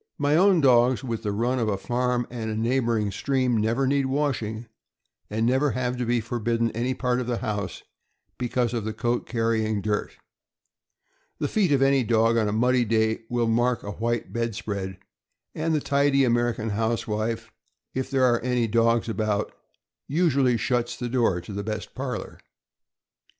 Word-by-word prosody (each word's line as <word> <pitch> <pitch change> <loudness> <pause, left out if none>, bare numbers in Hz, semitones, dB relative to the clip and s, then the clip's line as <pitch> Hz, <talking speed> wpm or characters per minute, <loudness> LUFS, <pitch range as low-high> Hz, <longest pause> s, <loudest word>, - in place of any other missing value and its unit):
My 145 0 +2
own 185 0 +5
dogs, 125 -1 +4
with 115 -4 -3
the 105 - -2
run 120 +5 0
of 115 - 0
a 100 - 0
farm 125 +3 -1
and 110 -3 -3
neighboring 115 -3 +1
stream, 130 +3 0
never 115 +5 +1
need 140 0 +1
washing, 125 -6 -1 0.6
and 110 +2 0
never 130 +4 +2
have 125 -1 -1
to 125 -1 -2
be 120 0 +2
forbidden 115 0 -1
any 125 +3 -2
part 125 -1 0
of 120 - -5
the 120 -1 -1
house 100 -5 -4 0.6
because 120 -1 0
of 115 -3 -2
the 110 +1 -3
coat 120 +2 -1
carrying 115 -2 0
dirt. 105 +1 -2 1.2
The - - -1
feet 200 -7 +1
of 135 -1 +4
any 135 -1 +3
dog 115 0 +3
on 110 -2 +2
a - - 0
muddy 125 +3 +2
day 110 0 0
will 120 -1 0
mark 120 +1 +1
a 100 - -5
white 115 +2 -2
bed 115 -2 -2
spread, 100 -4 -4 0.6
and 160 +1 0
the - - +2
tidy 140 -1 +2
American 120 -2 +1
housewife, 110 0 -2 0.4
if 130 0 -3
there 135 -2 +1
are 120 -2 +3
any 125 -1 0
dogs 115 +1 +2
about, 110 -2 -1 0.5
usually 140 -6 +2
shuts 120 +1 -1
the 120 0 -4
door 115 -8 +2
to 100 - -9
the 100 +1 -3
best 110 +1 -5
parlor. 130 -1 -5
120 Hz, 170 wpm, -25 LUFS, 110-130 Hz, 1.2 s, own